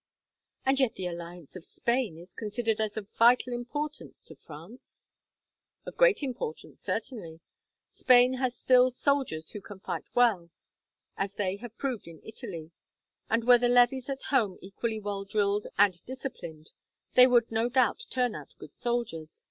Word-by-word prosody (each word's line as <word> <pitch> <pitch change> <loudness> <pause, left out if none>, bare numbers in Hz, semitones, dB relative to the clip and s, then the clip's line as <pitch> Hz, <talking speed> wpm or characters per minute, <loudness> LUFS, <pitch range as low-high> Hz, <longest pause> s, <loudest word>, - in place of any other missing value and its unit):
"And 265 +1 +3
yet 260 -4 +2
the 185 - -5
alliance 170 -2 -7
of 185 - -8
Spain 235 -7 -1
is 175 +2 -13
considered 220 0 -1
as 215 -1 -2
of 205 -2 -5
vital 245 +2 +4
importance 290 +5 -5
to - - -13
France!" 165 +11 -13 0.7
"Of - - -8
great - - +4
importance, 245 - -5
certainly. 205 -8 -4 0.5
Spain 250 0 +5
has 255 -2 0
still 255 +1 +5
soldiers 255 - -1
who 210 - -7
can 195 0 -11
fight - - -5
well, 220 -9 +3 0.7
as 195 +1 -3
they 195 -1 -1
have 230 +1 -10
proved 255 -9 -3
in 165 -2 -11
Italy; 190 -8 -7 0.6
and 225 +1 +1
were 245 0 +7
the 245 0 +2
levies 245 +2 +4
at 270 -1 -4
home 215 -9 +2
equally 220 +3 -4
well 205 -1 -4
drilled 205 0 0
and 195 -3 +3
disciplined, 240 - -8 0.4
they 250 0 +9
would 240 -2 +3
no 225 +2 +1
doubt 255 - +2
turn 250 -3 0
out - - -10
good - - -13
soldiers. 230 -11 -3
225 Hz, 155 wpm, -29 LUFS, 190-250 Hz, 0.7 s, they